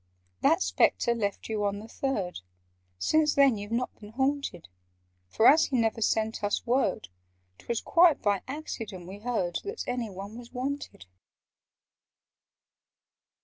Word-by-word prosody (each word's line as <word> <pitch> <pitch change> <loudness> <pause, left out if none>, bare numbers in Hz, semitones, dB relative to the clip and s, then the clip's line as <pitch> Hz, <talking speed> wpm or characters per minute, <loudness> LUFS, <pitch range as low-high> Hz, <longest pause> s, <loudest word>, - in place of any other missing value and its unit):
"That - - +4
Spectre 90 - +2
left 205 -4 -3
you 215 -2 -2
on 200 0 0
the 215 +2 -9
Third— 220 - -3 0.6
Since 300 - +2
then 275 -4 +5
you've 205 +1 -7
not 240 +2 -1
been 210 0 -12
haunted: 265 - -1 0.6
For, 220 - +1
as 315 +3 +7
he 260 - -1
never 225 -1 +1
sent 220 0 0
us 205 0 0
word, 240 - 0 0.5
'Twas 235 - -3
quite 335 -3 +5
by 205 -2 +1
accident 225 - -6
we 195 +2 -9
heard 210 -7 -1
That 420 +3 -5
any 245 -2 -2
one 200 +4 -8
was 240 -1 -12
wanted. 265 - -5
225 Hz, 140 wpm, -28 LUFS, 200-265 Hz, 0.6 s, as